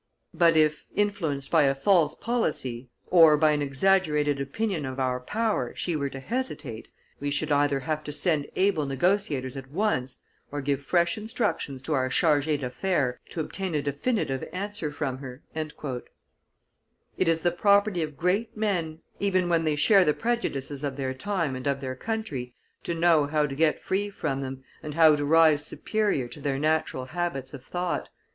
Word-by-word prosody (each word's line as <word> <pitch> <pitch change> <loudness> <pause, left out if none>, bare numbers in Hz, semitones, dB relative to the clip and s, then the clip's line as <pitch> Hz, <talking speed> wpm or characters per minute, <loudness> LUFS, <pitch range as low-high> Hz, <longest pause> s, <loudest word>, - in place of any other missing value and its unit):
But 170 -2 +4
if, 155 -1 +2
influenced 175 -10 -1
by 165 - +5
a 135 0 +2
false 170 +3 +3
policy, 135 - -2 0.2
or 165 -4 +7
by 155 0 +4
an 150 -1 0
exaggerated 150 -1 +2
opinion 175 +4 -2
of 130 0 -5
our 130 -1 0
power, 210 - -1
she 175 - -1
were 140 -2 -1
to 135 - -7
hesitate, 150 - -4 0.3
we 145 - -2
should 145 +2 -1
either 145 -1 +2
have 155 +3 -2
to 150 - -4
send 150 -1 +1
able 185 -7 +2
negotiators 140 -3 0
at 135 -1 -8
once, 140 -7 -1 0.3
or 145 - -3
give 140 0 -1
fresh 170 +6 +1
instructions 210 - -2
to 155 - -2
our 130 -2 +1
charges 150 0 +2
d'affaires 135 -1 -1
to 165 - -3
obtain 185 +2 -3
a 150 - +1
definitive 140 - -1
answer 190 -3 -4
from 135 -3 -3
her." 130 0 -9
It 150 -3 -8
is 165 0 +2
the 175 - +2
property 200 +1 +3
of 150 -3 -4
great 195 +6 0
men, 170 -7 -1 0.2
even 185 -3 +1
when 165 -1 +2
they 155 -1 +1
share 195 +6 +5
the 150 -3 +2
prejudices 145 - -2
of 140 -2 -3
their 130 -1 -2
time 165 -2 -2
and 130 +2 -5
of 140 -1 0
their 130 -1 -4
country, 145 - -4 0.3
to 170 - -2
know 165 -3 +4
how 150 0 +1
to 140 - -4
get 155 +2 +1
free 200 +2 -1
from 145 -8 -3
them, 130 0 -6 0.2
and 150 -1 -6
how 160 -2 +7
to 145 - -2
rise 155 -1 +5
superior 205 - -1
to 130 +5 -11
their 140 -1 -1
natural 155 -3 0
habits 160 -3 -3
of 135 -3 -9
thought. 175 +4 -3
150 Hz, 175 wpm, -27 LUFS, 135-180 Hz, 0.3 s, or